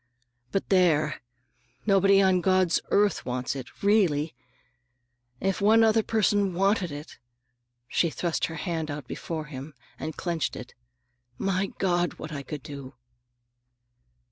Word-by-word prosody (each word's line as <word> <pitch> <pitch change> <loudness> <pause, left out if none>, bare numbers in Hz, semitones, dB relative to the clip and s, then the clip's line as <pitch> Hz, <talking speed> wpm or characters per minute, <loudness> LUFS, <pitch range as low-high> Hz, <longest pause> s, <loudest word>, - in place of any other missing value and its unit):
"But 195 - -1
there! 160 -6 +3 0.6
nobody 195 -1 +5
on 185 -1 +3
God's 185 -2 +3
earth 205 0 +2
wants 125 +2 -2
it, 130 +5 -9
really! 175 -8 +3 1.1
If 195 -1 -1
one 220 +3 +6
other 225 0 +4
person 205 -4 +1
wanted 195 -2 +2
it,"—she 120 -1 -5
thrust 170 +1 -1
her 160 - -6
hand 165 -1 -3
out 145 -2 -5
before 160 +1 -5
him 140 0 -9 0.2
and 155 0 -5
clenched 170 -3 -2
it,—"my 125 +9 -6
God, 175 -2 +1
what 155 - -8
I 145 -2 -4
could 140 0 -7
do!" 140 -2 -9
165 Hz, 120 wpm, -27 LUFS, 135-195 Hz, 1.1 s, one